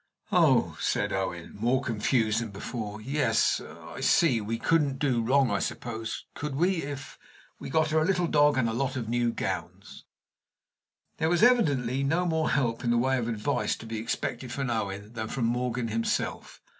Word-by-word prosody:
"Oh!" - - +3
said - - 0
Owen, - - -3
more 120 +4 +2
confused 110 -1 +1
than 115 - -4
before. 105 +1 -6
"Yes 130 -2 +1
I - - -10
see; 130 -10 +3
we 110 +2 -3
couldn't 145 -1 +1
do 130 -4 +1
wrong, 130 +1 +3
I 100 - +1
suppose 115 -1 -4
could 145 -1 -4
we? 180 +5 +2
if 140 -1 -7 0.4
we - - -7
got 155 +2 +2
her 160 - +3
a - - +2
little 180 0 +1
dog, 145 -3 +4
and 125 -3 +2
a 115 - -1
lot 135 +3 -1
of 120 -4 -3
new 120 0 +1
gowns." - - -5 1.1
There 160 0 +1
was, 175 +4 +2
evidently, 140 - +3
no 165 +6 +1
more 160 -2 +1
help 120 -2 0
in 120 - 0
the 120 - +3
way 130 +2 +2
of 115 - -2
advice 110 -3 -1
to - - -11
be 110 -1 -4
expected 120 +2 -3
from 135 -1 -2
Owen 105 -1 -3
than 110 -2 -4
from 120 +1 -2
Morgan 120 0 -1
himself. 115 +1 -2
125 Hz, 180 wpm, -28 LUFS, 115-145 Hz, 1.1 s, dog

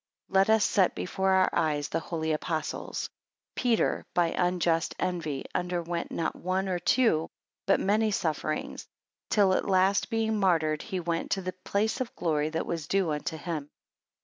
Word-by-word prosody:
12 - - -9
Let 220 - +6
us 220 - +2
set 190 -3 +3
before 190 +1 -1
our 190 0 +4
eyes, 150 -3 0
the 165 - 0
holy 160 -1 -3
Apostles; 155 +1 -3 0.5
Peter 240 -3 +1
by 175 -1 +3
unjust 175 -2 +1
envy 160 -7 -2
underwent 175 -1 -2
not 165 - -2
one 185 +2 -1
or 180 -2 -1
two, 175 -4 +2 0.4
but 195 - +4
many 215 +3 +2
sufferings; 155 -6 -2 0.4
till 200 -3 +4
at - - 0
last 190 +1 +3
being 220 -2 0
martyred, 160 -5 +2
he 190 -4 -4
went 170 -1 -2
to 195 - -1
the 185 0 -3
place 215 +5 0
of 245 - -4
glory 155 -2 0
that 160 +1 -2
was 165 -3 -4
due 190 -3 +1
unto 150 +2 -3
him. 155 -3 -4
180 Hz, 165 wpm, -28 LUFS, 160-195 Hz, 0.5 s, Let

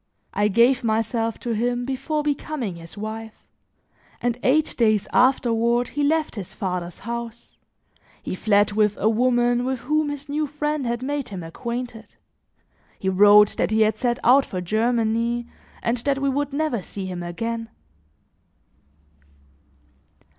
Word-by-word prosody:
I 205 - +2
gave 235 +5 +3
myself 225 0 0
to 240 - -3
him 245 +2 0
before 275 +4 -2
becoming 285 - -2
his 165 +3 -11
wife, 220 +1 -6 0.8
and 245 0 -1
eight 300 +4 +2
days 215 -4 +2
afterward 240 -2 +3
he 290 - -3
left 315 +2 +1
his 200 -6 -7
father's 180 -3 -4
house; 235 +1 -7 0.6
he - - -4
fled 205 +1 +2
with 210 0 +2
a - - +1
woman 240 +1 +2
with 260 -1 -2
whom 305 0 0
his 290 -1 -6
new 300 +1 -1
friend 295 -1 -2
had 235 +1 -2
made 285 0 -3
him 190 -4 -6
acquainted; 235 +5 -6 0.8
he 190 - -1
wrote 205 +2 +6
that - - +1
he 220 +1 +2
had 215 0 +2
set 240 -2 +1
out 265 +3 +6
for 185 - -5
Germany 230 +4 0 0.4
and 235 +1 +1
that 275 +3 0
we 275 0 0
would 285 +1 -1
never 285 -6 -1
see 195 +1 -6
him 180 -1 -5
again. 225 +6 -4
235 Hz, 145 wpm, -23 LUFS, 215-265 Hz, 0.8 s, wrote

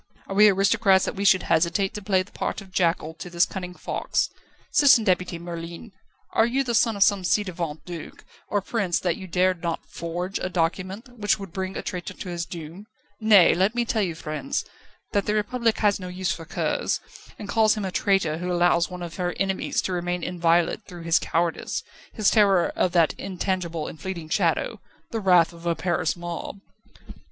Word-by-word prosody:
Are - - -6
we 210 +2 +7
aristocrats 195 0 +3
that - - -2
we 200 - -3
should 190 -1 +5
hesitate 170 +4 +1
to 210 - -6
play 190 -2 +2
the 195 - -21
part - - -3
of 195 -2 -13
jackal 165 -3 0
to 180 - -7
this 175 0 +3
cunning 180 -2 -6
fox? - - -1 0.4
Citizen 280 -6 +6
Deputy 180 -3 +1
Merlin, 170 +4 -7 0.4
are 225 - +4
you 265 +3 +1
the 240 -2 -2
son 225 -1 +3
of 200 - +5
some 200 -1 +3
ci 205 +4 +2
devant 170 -5 -5
duke 175 -3 -9 0.2
or 205 - 0
prince 195 -4 -1
that 175 -3 0
you 190 - -9
dared 180 0 +1
not 170 -1 -3
forge 175 +3 -4
a 185 - -2
document 185 +6 -2
which 205 0 +2
would 195 -4 -9
bring 190 0 -3
a - - -4
traitor 180 0 -5
to 185 - -7
his 170 -1 -3
doom? 170 +4 -9 0.3
Nay; 215 -5 +6
let 195 +6 +1
me 240 -1 +1
tell 225 -1 0
you, 175 -5 -1
friends, 160 - -3 0.5
that 200 -1 +1
the 210 - +1
Republic 225 +2 0
has 205 -2 +2
no 185 - -6
use 180 -1 -2
for 165 0 -5
curs, - - -1 0.4
and 205 - -8
calls 215 +1 +3
him 210 - -2
a 190 - -3
traitor 180 -6 +1
who 180 +1 -3
allows 175 -1 +3
one 180 -1 -7
of 170 -1 -7
her 180 -1 -2
enemies 190 -1 0
to 185 - -2
remain 175 0 -2
inviolate 170 -1 +1
through 175 -2 -9
his 165 0 +3
cowardice, 170 0 -1 0.3
his 215 -4 +2
terror 200 -5 +4
of 180 - +1
that 170 -3 +4
intangible 180 -4 -2
and 155 - -9
fleeting 175 -4 -5
shadow - - 0 0.3
the 225 - -2
wrath 180 -4 +4
of 170 0 -9
a 170 - +2
Paris 170 -3 0
mob." 175 +2 -5
185 Hz, 200 wpm, -25 LUFS, 170-200 Hz, 0.5 s, we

